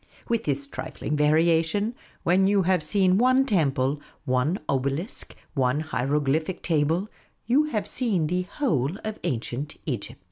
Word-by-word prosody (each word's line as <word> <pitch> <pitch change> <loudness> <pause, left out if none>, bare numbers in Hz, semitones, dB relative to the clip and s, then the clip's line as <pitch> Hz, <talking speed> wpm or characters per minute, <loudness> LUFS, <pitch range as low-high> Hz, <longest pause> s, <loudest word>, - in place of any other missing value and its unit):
With 230 -1 0
this 140 -1 -1
trifling 145 +1 -4
varia 160 +3 +4
tion, 205 +8 -1 0.3
when 185 +3 +4
you 200 -1 +3
have 180 -1 +2
seen 185 +4 +3
one 255 +2 +4
temple, 145 - +1 0.2
one 130 +8 +1
obelisk, 140 - -2 0.2
one 135 0 +1
hiero 145 -2 0
glyphic 155 +6 -1
table, 165 +4 +1 0.4
you 270 +6 +3
have 225 -9 -2
seen 205 -11 0
the 180 +4 0
whole 180 - -1
of 215 0 -4
Ancient 125 +3 -3
Egypt. 125 -9 -4
160 Hz, 145 wpm, -26 LUFS, 140-195 Hz, 0.4 s, varia